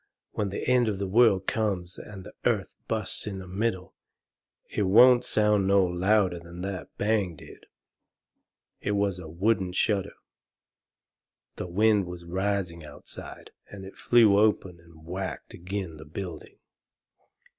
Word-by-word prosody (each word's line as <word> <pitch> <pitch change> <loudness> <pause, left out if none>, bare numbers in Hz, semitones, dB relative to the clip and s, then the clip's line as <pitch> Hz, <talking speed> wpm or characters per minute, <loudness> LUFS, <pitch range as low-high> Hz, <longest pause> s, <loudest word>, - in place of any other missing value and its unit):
When 105 -2 -2
the 95 - -4
end 125 -2 +4
of 105 -3 -1
the 100 - -2
world 100 -1 +4
comes 95 -5 -2
and 100 -3 -10
the - - -12
earth - - 0
busts 110 -2 -2
in 100 -2 -4
the 95 - -8
middle, 95 -1 -2 0.7
it - - -3
won't 120 +6 +6
sound 105 -2 +2
no 100 -1 +4
louder 90 +1 +1
than 85 +1 -10
that 95 0 -5
bang 105 -5 0
did. - - -14 1.1
It 105 - -2
was 100 -2 0
a 80 -3 -9
wooden 95 +2 0
shutter. 100 0 0 1.4
The - - -4
wind 105 +1 +2
was 90 -1 -8
rising 95 -2 -2
outside, 75 - -10 0.2
and 95 -1 -9
it 95 - -11
flew 110 -4 +5
open 95 -5 +1
and 85 -1 -18
whacked 95 +3 -5
agin' 90 -2 -5
the 80 - -11
building. 80 +1 -8
95 Hz, 145 wpm, -27 LUFS, 90-105 Hz, 1.4 s, won't